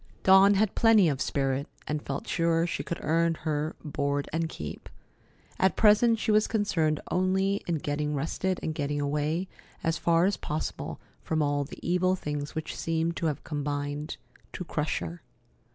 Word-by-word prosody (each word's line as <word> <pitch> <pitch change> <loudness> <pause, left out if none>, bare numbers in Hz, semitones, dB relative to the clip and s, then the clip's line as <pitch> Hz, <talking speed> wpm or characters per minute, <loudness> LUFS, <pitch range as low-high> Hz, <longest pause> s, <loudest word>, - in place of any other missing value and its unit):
Dawn 195 +1 +7
had 205 0 +2
plenty 220 -6 +5
of 135 -3 -2
spirit, 135 0 0 0.2
and 150 0 -2
felt 140 -1 -5
sure 165 -1 +2
she 175 - -2
could 170 - -4
earn 165 +1 +2
her 155 -1 -2
"board 140 -1 -1
and 165 0 0
keep." 75 - -7 0.7
At 190 0 +3
present, 225 +2 +5
she 220 0 0
was 215 0 +4
concerned 165 -8 +1
only 190 +2 +1
in 170 - +1
getting 150 0 -2
rested 175 +6 -1
and 160 - -1
getting 145 -1 -2
away 150 +5 -1 0.4
as 165 0 0
far 170 +1 +3
as 200 0 +1
possible 155 +1 -4 0.2
from 160 -1 0
all 145 0 0
the - - -10
evil 180 +1 +2
things 150 -4 -4
which 160 - -4
seemed 165 +1 -1
to 165 - 0
have 150 -3 -3
combined 145 0 -3 0.4
to - - -4
crush 150 -2 -1
her. 170 0 -6
160 Hz, 170 wpm, -28 LUFS, 145-185 Hz, 0.7 s, Dawn